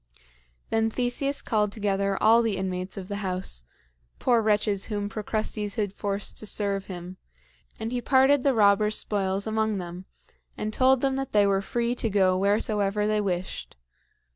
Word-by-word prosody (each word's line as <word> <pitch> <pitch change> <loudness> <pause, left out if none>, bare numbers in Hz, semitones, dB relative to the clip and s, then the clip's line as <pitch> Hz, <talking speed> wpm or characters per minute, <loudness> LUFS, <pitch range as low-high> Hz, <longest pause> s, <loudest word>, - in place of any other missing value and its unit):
Then 225 0 +2
Theseus 250 +4 -1
called 210 -3 +1
together 200 -2 -1
all 230 +2 +5
the 220 -4 0
inmates 185 0 -4
of 190 -2 -6
the 200 0 -4
house, 185 - -2 0.5
poor 240 -2 +2
wretches 210 -2 +1
whom 205 -1 -3
Procrustes 215 -1 -3
had 205 -4 -1
forced 200 0 -3
to 215 - -3
serve 200 -2 -1
him; 180 0 -8 0.6
and 220 +1 -4
he 250 -1 -2
parted 265 +3 +4
the 270 -1 +2
robber's 210 0 +4
spoils 195 -1 -1
among 220 -1 0
them 180 0 -7 0.5
and 215 0 -3
told 260 +1 +4
them 270 -1 +1
that 270 -1 -4
they 205 -1 +5
were 195 -1 +2
free 235 +4 -1
to 240 -2 -2
go 190 -2 +3
wheresoever 205 +1 +1
they 215 0 +1
wished. 185 -2 -4
210 Hz, 165 wpm, -26 LUFS, 195-225 Hz, 0.6 s, all